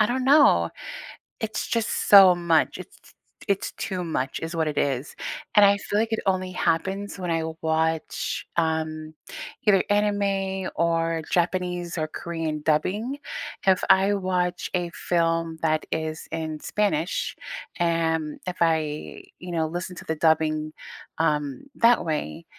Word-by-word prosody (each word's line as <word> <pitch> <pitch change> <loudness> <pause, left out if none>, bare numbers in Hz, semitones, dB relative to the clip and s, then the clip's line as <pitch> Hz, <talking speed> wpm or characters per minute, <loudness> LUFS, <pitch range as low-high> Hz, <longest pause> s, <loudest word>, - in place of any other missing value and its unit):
I 215 - +5
don't 255 +2 -1
know. 265 - +5 0.7
It's 220 0 -3
just 230 -1 -1
so 195 -3 +10
much. 170 -2 +2
It's - - -11 0.5
it's 200 -1 0
too 185 -2 -4
much 150 -6 -2
is 165 +1 -4
what 160 -1 +1
it 150 - -3
is. 135 0 -1 0.4
And 205 - +8
I 200 0 +5
feel 205 - -3
like 225 0 0
it 225 - 0
only 185 -1 0
happens 190 +4 -1
when 180 -2 -3
I 165 -1 0 0.2
watch, 160 0 -1
um, 160 -1 -1 0.5
either 195 -2 +5
anime 200 -2 0
or 165 -1 +1
Japanese 180 0 -1
or 155 -1 -1
Korean 160 -2 -4
dubbing. 205 - 0 0.5
If 190 -1 +4
I 195 +2 +5
watch 180 -2 -1
a 175 -1 -1
film 165 -1 0
that 155 -1 +1
is 160 0 -3
in 160 -1 -4
Spanish, 195 -4 -1 0.4
am, 165 -2 0
if 180 - -3
I, 155 -2 0 0.2
you 180 0 -7
know, 165 -2 0
listen 180 +2 -5
to - - -9
the 160 - -2
dubbing, 155 -1 +1 0.5
um, 150 -4 0
that 235 -3 +4
way, 150 - -3
170 Hz, 145 wpm, -25 LUFS, 160-190 Hz, 0.7 s, so